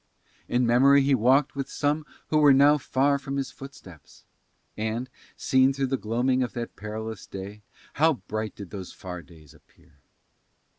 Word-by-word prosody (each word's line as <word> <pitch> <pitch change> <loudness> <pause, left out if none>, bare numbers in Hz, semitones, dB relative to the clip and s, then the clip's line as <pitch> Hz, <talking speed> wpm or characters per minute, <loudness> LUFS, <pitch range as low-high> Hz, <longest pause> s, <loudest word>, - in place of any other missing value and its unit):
In 125 +1 +1
memory 135 +4 +5
he 140 +1 +2
walked 130 +4 +3
with 140 -1 -4
some 150 +1 -1 0.2
who 155 - +3
were 145 -2 +7
now 145 +2 +5
far 140 +1 +1
from 140 0 -5
his 135 -1 -3
footsteps. 95 - -14 0.5
And, 110 +4 -3 0.3
seen 130 +1 +3
through 135 0 -1
the - - +4
gloaming 125 +4 0
of 125 - -2
that 120 -1 -6
perilous 110 0 -7
day, 100 +2 -8 0.3
how 160 +2 +3
bright 110 -2 -5
did 100 -3 -10
those 95 -3 -7
far 90 -2 -8
days 80 -5 -18
appear! 70 - -25
125 Hz, 160 wpm, -26 LUFS, 105-140 Hz, 0.5 s, were